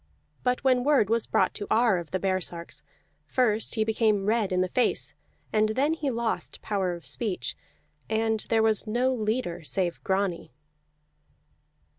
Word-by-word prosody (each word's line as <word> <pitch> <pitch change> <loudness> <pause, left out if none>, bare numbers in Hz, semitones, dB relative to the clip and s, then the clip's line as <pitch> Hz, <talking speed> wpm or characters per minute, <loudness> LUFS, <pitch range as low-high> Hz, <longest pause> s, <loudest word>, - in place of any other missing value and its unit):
But 250 +1 0
when 255 -2 +3
word 270 -7 +3
was 230 -1 +2
brought - - +2
to 205 - -6
Ar 225 -5 +3
of 170 - -8
the 185 - -1
baresarks, 180 -3 -3 0.4
first 225 -4 +1
he 220 - +2
became 215 -2 +1
red 215 -2 +1
in 180 0 +2
the 185 - +1
face, 245 +7 +1 0.4
and 215 0 +3
then 285 +4 +2
he 310 -3 -2
lost 235 -2 -3
power 190 -4 -1
of 170 - -12
speech, 210 -6 -1 0.5
and 220 0 +1
there 225 -1 +3
was 220 0 +3
no 245 +4 +1
leader 215 -6 -2
save 175 +2 -2
Grani. 190 -8 -1
215 Hz, 155 wpm, -27 LUFS, 190-235 Hz, 0.5 s, when